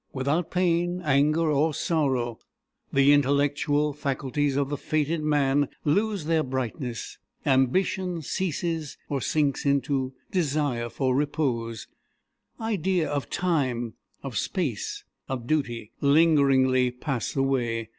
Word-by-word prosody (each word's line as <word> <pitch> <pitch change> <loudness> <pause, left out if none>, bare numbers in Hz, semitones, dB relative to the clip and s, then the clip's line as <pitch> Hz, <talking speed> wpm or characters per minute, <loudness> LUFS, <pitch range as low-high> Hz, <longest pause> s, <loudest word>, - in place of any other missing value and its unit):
Without 140 +6 0
pain, 175 0 +1
anger, 155 +3 +3
or 150 +1 +2
sorrow, 130 -9 0 0.5
the 140 +1 +5
intellectual 145 +1 +2
faculties 140 0 -1
of 140 -1 0
the 145 - -1
fated 155 +2 -1
man 145 -2 +2 0.2
lose 200 +3 +1
their 160 0 +2
brightness. 130 -2 -4 0.3
Ambition 170 +6 +1
ceases, 165 -2 -2
or 140 -2 -1
sinks 145 -1 0
into 140 -1 0 0.2
desire 145 -8 0
for 130 +1 0
repose. 125 -6 -1 0.7
Idea 190 -6 0
of 145 -2 -2
time, 130 -10 0 0.3
of 135 -4 -6
space, 150 - -3 0.3
of 130 -3 -3
duty, 120 -6 -1
lingeringly 140 -4 +4
pass 125 -1 -3
away. 120 -5 0
145 Hz, 110 wpm, -26 LUFS, 130-155 Hz, 0.7 s, the